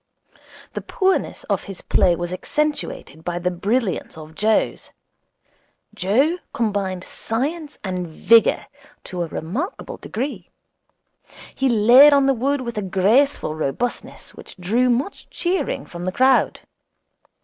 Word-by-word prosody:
The - - -4
poorness 380 0 0
of - - -2
his 195 -2 -8
play 180 -2 +3
was 175 +1 -4
accentuated 290 - -3
by 175 0 -3
the 180 +1 -1
brilliance 200 +1 -1
of 155 0 -10
Joe's. 215 +6 0 1.0
Joe 250 - +1
combined 200 -5 -1
science 290 - -4
and 185 -3 -3
vigour 225 +8 +4 0.4
to 180 -1 -5
a 170 - -1
remarkable 215 - -5
degree. 225 -6 -5 1.0
He 265 0 +1
laid 245 +6 +7
on 280 -1 +4
the 270 - +4
wood 270 +3 0
with 235 -4 -4
a - - -2
graceful 200 - +2
robustness 155 - -3
which - - -13
drew 225 +8 +1
much 255 +11 -2
cheering 360 +2 -2
from 175 0 -8
the 185 - -1
crowd. 260 +6 +3
220 Hz, 125 wpm, -21 LUFS, 180-270 Hz, 1.0 s, laid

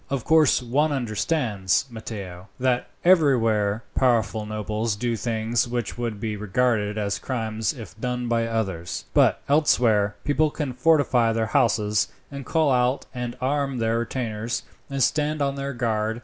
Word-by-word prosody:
"Of 135 -4 -2
course 155 -5 +4
one 145 +6 +1
understands, 115 - 0
Matteo, 100 -5 -7
that 125 -1 +1 0.2
everywhere 115 - +3
powerful 115 -4 +1
nobles 110 +1 -2
do 120 +2 -1
things 115 +1 -1
which 120 -3 -3
would 115 -4 -4
be 110 0 -3
regarded 105 0 0
as 100 -1 -1
crimes 110 -4 -2
if 115 - -10
done 125 -1 -2
by 115 -1 +1
others; 95 -7 -3
but, - - +3
elsewhere, 115 -9 +3
people 150 +1 +2
can 145 -3 -4
fortify 125 -4 +3
their 110 0 0
houses, 105 -2 +2 0.2
and 140 -2 -7
call 160 -4 +2
out 125 +1 +1
and 125 -1 -5
arm 135 0 -1
their 115 0 +1
retainers, 115 -1 -3 0.3
and 140 -1 0
stand 150 +3 +1
on 140 -1 0
their 140 0 -4
guard. 110 -2 -1
120 Hz, 150 wpm, -24 LUFS, 110-135 Hz, 0.3 s, course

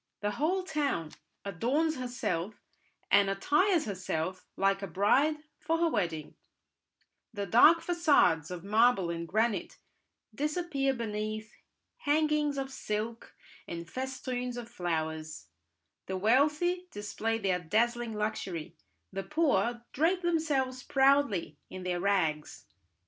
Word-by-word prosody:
The 205 0 0
whole 345 - 0
town 285 - -1 0.3
adorns 260 - 0
herself 230 -6 -3 0.6
and 200 0 +5
attires 300 - +2
herself 185 -3 -3
like 195 0 +2
a 195 - -4
bride 210 - +3 0.2
for 330 +1 0
her 335 0 +2
wedding; 170 - -2 1.0
the 205 -3 -4
dark 300 - +6
facades 315 - +3
of 180 -2 -6
marble 210 -3 +3
and 170 0 -4
granite 220 +4 0 0.6
disappear 295 -1 -1
beneath 215 -1 -4 0.4
hangings 300 - +1
of 270 0 -3
silk 225 -1 -4 0.3
and 170 0 -6
festoons 250 +1 -4
of 240 -1 -6
flowers; 160 - -4 0.6
the 190 - -2
wealthy 300 - +2
display 220 0 -2
their 190 -4 0
dazzling 230 +6 0
luxury, 210 -6 -3 0.4
the 195 - -2
poor 260 -4 +1
drape 355 +6 +1
themselves 290 -7 0
proudly 270 -8 +2
in 185 0 -7
their 180 -1 -1
rags. 175 -6 0
230 Hz, 115 wpm, -30 LUFS, 190-290 Hz, 1.0 s, dark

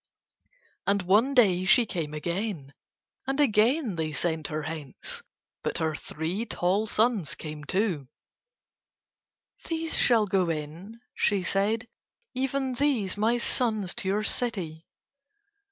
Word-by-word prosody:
And 200 -1 +2
one 215 +10 +3
day 190 -7 +5
she 230 +6 +6
came 160 -7 -4
again, 170 -3 -3 0.5
and 270 +2 -1
again 235 - +3
they 160 -1 -1
sent 160 -1 -1
her 155 0 -3
hence. 155 -3 -6 0.4
But - - -2
her 160 -1 0
three 160 +8 -4
tall 195 +5 0
sons 215 -8 +1
came 150 -1 -7
too. 180 - 0 1.6
"These 325 -1 -1
shall 230 -4 +4
go 185 -3 +1
in," 165 +8 -5
she 200 -3 +1
said. 210 +6 0 0.5
"Even 265 0 -1
these 245 -8 +1
my 220 +3 +2
sons 220 -6 0
to 235 -5 -4
your 205 +2 +1
city." 185 -10 -1
200 Hz, 120 wpm, -27 LUFS, 165-235 Hz, 1.6 s, she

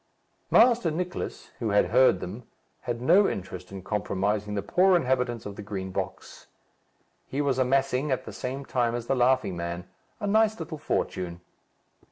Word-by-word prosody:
Master 235 -6 +5
Nicless, 180 +3 -4
who 115 - -1
had 100 0 +4
heard 125 -6 +5
them, 105 +7 -7 0.3
had 120 -1 -4
no 185 +8 +5
interest 90 -1 -6
in 95 -2 -8
compromising 105 0 -1
the 100 - -2
poor 185 - +4
inhabitants 125 -6 0
of 100 -1 -6
the - - -6
Green 95 -2 -5
Box. - - -6 0.8
He 135 - -4
was 140 -3 +1
amassing, 135 +2 +1
at 130 - -1
the - - -8
same 135 +2 -5
time 120 -3 0
as 120 -1 -4
the 135 - +1
Laughing 125 -6 +2
Man, 85 +1 -5 0.3
a 210 - -3
nice 220 +1 +3
little 155 -3 -6
fortune. 90 - -2
125 Hz, 165 wpm, -27 LUFS, 100-140 Hz, 0.8 s, Master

